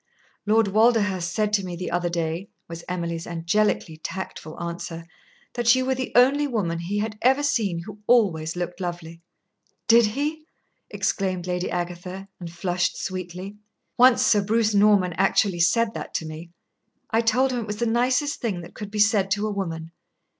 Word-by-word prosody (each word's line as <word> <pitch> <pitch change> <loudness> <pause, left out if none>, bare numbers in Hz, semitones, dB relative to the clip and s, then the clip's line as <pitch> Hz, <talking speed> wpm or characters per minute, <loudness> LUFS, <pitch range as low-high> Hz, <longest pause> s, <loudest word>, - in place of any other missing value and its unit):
"Lord 220 -1 +3
Walderhurst 205 -5 +2
said 210 +3 0
to 200 -2 +2
me 180 -2 -5
the 180 0 -5
other 175 0 0
day," 170 +3 -3 0.2
was 170 0 -8
Emily's 170 -2 -3
angelically 170 0 0
tactful 160 -1 -7
answer, 170 -1 -5 0.5
"that 240 0 +4
you 260 0 0
were 265 - +1
the 260 0 -4
only 275 +4 +5
woman 190 -10 -1
he 180 +5 -3
had 215 0 -3
ever 265 +3 +3
seen 200 -11 0
who 210 +2 -10
always 175 -10 +2
looked 175 +1 -4
lovely." 170 -2 -6 0.7
"Did 230 -1 +6
he?" 300 +7 -3 0.4
exclaimed 185 -3 -1
Lady 180 0 -2
Agatha, 180 +2 -5
and 170 -2 -7
flushed 175 +1 -1
sweetly. 185 +2 -6 0.4
"Once 250 0 +5
Sir 210 -2 +4
Bruce 215 +1 +1
Norman 200 -3 +4
actually 195 -1 +2
said 220 +7 +3
that - - -7
to 160 - -1
me. 155 +2 -8 0.6
I 225 - +3
told 250 +4 +2
him 250 - -1
it 225 - -5
was 210 0 -4
the 235 - 0
nicest 250 +5 +1
thing 205 -8 -2
that 170 - -12
could 210 -2 -7
be 210 - -6
said 205 -2 +3
to 205 +2 0
a 215 - -1
woman. 165 -4 -4
195 Hz, 175 wpm, -24 LUFS, 175-225 Hz, 0.7 s, Did